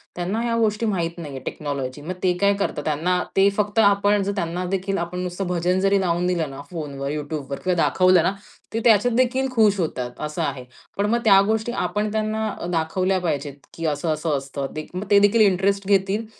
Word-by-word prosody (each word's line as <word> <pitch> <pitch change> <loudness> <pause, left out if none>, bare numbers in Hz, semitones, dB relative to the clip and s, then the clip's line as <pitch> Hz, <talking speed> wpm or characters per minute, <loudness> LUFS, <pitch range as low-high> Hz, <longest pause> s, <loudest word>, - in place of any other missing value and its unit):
त्यांना 180 +5 -2
ह्या 235 -1 0
गोष्टी 220 0 +1
माहीत 170 -5 -1
नाहीये 145 -5 -7
टेक्नॉलॉजी. 140 -2 -4
मग 170 +5 -4
ते 180 - +4
काय 200 0 +4
करतात, 150 -7 -2
त्यांना 170 +4 0
ते 195 +1 +5
फक्त 210 +1 0
आपण 205 0 +4
जर 200 - -1
त्यांना 175 -1 -2
देखील 195 +1 -2
आपण 175 +1 -4
नुसतं 180 +1 -4
भजन 180 +1 0
जरी 195 +1 +3
लावून 175 -1 0
दिलं 170 -5 0
ना 135 +1 -8
फोनवर, 140 -4 -5
YouTubeवर 145 -2 -4
किंवा 185 0 +1
दाखवलं 185 -2 +4
ना, - - +2 0.4
ते 225 - 0
त्याच्यात 225 +1 +4
देखील 255 +2 +2
खुश 210 -3 +4
होतात, 125 -7 -2
असं 150 +3 -4
आहे. 140 -4 -3 0.3
पण 200 - +1
मग 235 +1 +2
त्या 195 -2 +7
गोष्टी 220 +2 0
आपण 210 -3 -1
त्यांना 215 0 -1 0.2
दाखवल्या 185 +3 0
पाहिजेत, 145 -4 -3 0.2
की 165 - -5
असं, 150 +2 -1
असं 155 -1 -1
असतं. 135 0 -5
दे 155 0 -5
मग 190 +3 -4
ते 200 - +7
देखील 205 -2 +4 0.3
घेतील 200 +2 +1
180 Hz, 195 wpm, -23 LUFS, 155-205 Hz, 0.4 s, त्या